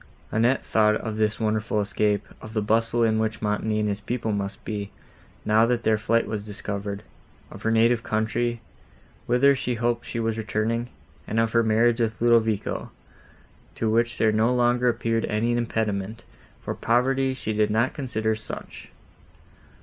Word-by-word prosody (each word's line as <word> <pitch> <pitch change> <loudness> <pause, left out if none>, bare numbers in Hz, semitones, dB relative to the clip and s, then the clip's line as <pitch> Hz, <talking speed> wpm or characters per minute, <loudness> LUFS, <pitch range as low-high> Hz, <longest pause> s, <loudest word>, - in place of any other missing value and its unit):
Annette 120 +4 +2
thought 105 -1 +3
of 110 0 -4
this 110 0 +1
wonderful 110 -1 0
escape, 105 0 0
of 110 - -9
the 110 - +2
bustle 115 +2 +2
in 110 -1 +2
which 110 0 -1
Montoni 105 0 0
and 105 - 0
his 100 0 -2
people 115 0 -2
must 100 -1 -4
be, 105 -2 -4 0.6
now 110 +2 +4
that 120 -1 0
their 110 - +3
flight 115 +1 +2
was 105 -1 -4
discovered; 100 -1 -5 0.5
of - - -10
her 110 - 0
native 115 +1 +3
country, 115 +2 -1 0.7
whither 125 +4 +5
she 125 -2 -2
hoped 120 0 0
she 120 - -3
was 115 -1 -1
returning, 115 +2 -1 0.4
and 110 - 0
of 115 0 +2
her 115 - +4
marriage 115 +1 +3
with 110 -1 -1
Ludovico, 115 -3 +1 0.9
to 110 -1 0
which 115 +1 +1
there 110 - +3
no 110 +3 +2
longer 120 0 +3
appeared 115 -1 0
any 115 +3 0
impediment, 110 -2 -2 0.4
for - - -3
poverty 130 +3 +1
she 110 -4 -3
did 105 0 +2
not 115 +4 +1
consider 110 -5 -1
such. 110 0 -8
110 Hz, 165 wpm, -25 LUFS, 110-120 Hz, 0.9 s, whither